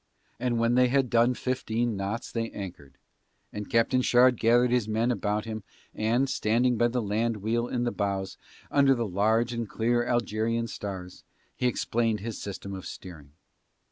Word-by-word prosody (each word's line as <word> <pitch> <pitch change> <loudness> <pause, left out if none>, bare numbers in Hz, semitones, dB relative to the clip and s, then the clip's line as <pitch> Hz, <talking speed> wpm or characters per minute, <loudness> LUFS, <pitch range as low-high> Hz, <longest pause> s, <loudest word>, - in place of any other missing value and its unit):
And 125 -2 0
when 115 +1 +2
they 125 0 +5
had 130 -1 +1
done 120 +2 +4
fifteen 120 -3 -1
knots 100 +4 -4
they 115 -1 -2
anchored, 90 -8 -8 0.6
and 105 0 -6
Captain 125 +1 +3
Shard 125 -1 +4
gathered 120 +2 +4
his 125 -4 +1
men 110 +3 +1
about 105 -2 -1
him 110 -1 -5 0.3
and, 115 +5 +1
standing 120 +1 +1
by 120 +1 +3
the 120 0 -1
land 110 +2 0
wheel 115 +4 -1
in 120 -1 -1
the 120 - 0
bows, 95 -1 -2 0.4
under 140 -1 +5
the 120 -2 -2
large 110 +5 +1
and 115 -3 -3
clear 120 +1 +1
Algerian 115 -1 0
stars, 95 -5 -7 0.3
he 125 - 0
explained 115 -2 0
his 115 0 -5
system 100 0 -6
of 95 -1 -7
steering. 75 -7 -10
115 Hz, 170 wpm, -27 LUFS, 105-120 Hz, 0.6 s, they